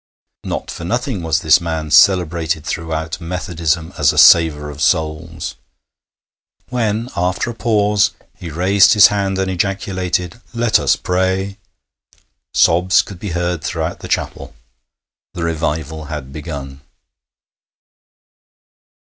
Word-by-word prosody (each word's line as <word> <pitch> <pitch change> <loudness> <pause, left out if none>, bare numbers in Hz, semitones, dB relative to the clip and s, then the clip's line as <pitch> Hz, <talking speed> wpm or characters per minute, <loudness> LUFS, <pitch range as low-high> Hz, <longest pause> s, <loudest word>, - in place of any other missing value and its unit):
Not - - -4
for - - -8
nothing 120 +2 -2
was 80 0 0
this 80 +2 +4
man 80 -2 -4
cerebrated 85 -2 +3
throughout 80 0 -4
Methodism 85 -2 -2
as - - +4
a - - -7
saver 80 -3 +6
of 75 0 -10
souls. 80 +1 -1 1.2
When, 115 -1 -1
after 90 +6 -1
a - - -8
pause, 105 -2 +2 0.3
he 85 - -8
raised 95 +5 +4
his 105 - +8
hand 100 -1 -1
and 95 0 -1
ejaculated, 95 +1 -2
'Let 115 -1 +2
us - - +2
pray,' 95 +2 -1 0.9
sobs 90 +2 +3
could 95 -4 -11
be 105 - -5
heard 85 -1 -2
throughout 80 -1 -3
the - - -8
chapel. - - -3 0.8
The 85 - -4
Revival 80 -1 -3
had 70 -3 -7
begun. 70 -3 -7
85 Hz, 120 wpm, -17 LUFS, 80-95 Hz, 1.2 s, his